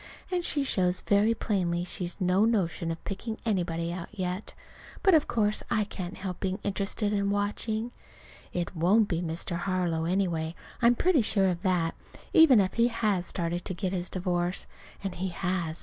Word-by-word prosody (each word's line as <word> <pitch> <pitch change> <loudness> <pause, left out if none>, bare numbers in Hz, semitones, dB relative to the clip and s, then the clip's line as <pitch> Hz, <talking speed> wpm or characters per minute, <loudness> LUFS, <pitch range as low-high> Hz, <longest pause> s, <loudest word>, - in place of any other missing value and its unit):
And 360 -1 0
she 290 -4 +1
shows 180 -8 +1
very 210 +3 +3
plainly 175 -6 0
she's 180 0 -3
no 185 +2 +3
notion 190 -7 +1
of 165 0 -5
picking 220 +3 -4
anybody 170 -5 -1
out 175 -1 -6
yet. 185 -1 -4 0.5
But 385 - +6
of 310 -2 +4
course 215 -2 +1
I 215 - +2
can't 185 -2 -6
help 185 -2 -5
being 190 -1 -1
interested 205 +1 -1
and 200 -1 +1
watching. 215 +3 -1 0.6
It 175 +1 -3
won't 195 +7 +4
be 170 -3 -1
Mr. 170 0 -2
Harlow, 175 -3 0
anyway. 170 -3 0 0.3
I'm 240 0 +5
pretty 345 0 +3
sure 205 -2 +2
of 175 -1 -2
that, 180 -3 +1 0.4
even 320 -9 +8
if 190 -1 +1
he 235 0 +3
has 210 -6 0
started 170 -1 -1
in 175 - -7
to - - -3
get 185 0 -2
his 180 -1 -2
divorce. 180 -1 -1 0.4
(And 195 -2 -3
he 185 +2 -3
has. 175 -2 -2
185 Hz, 180 wpm, -28 LUFS, 175-210 Hz, 0.6 s, even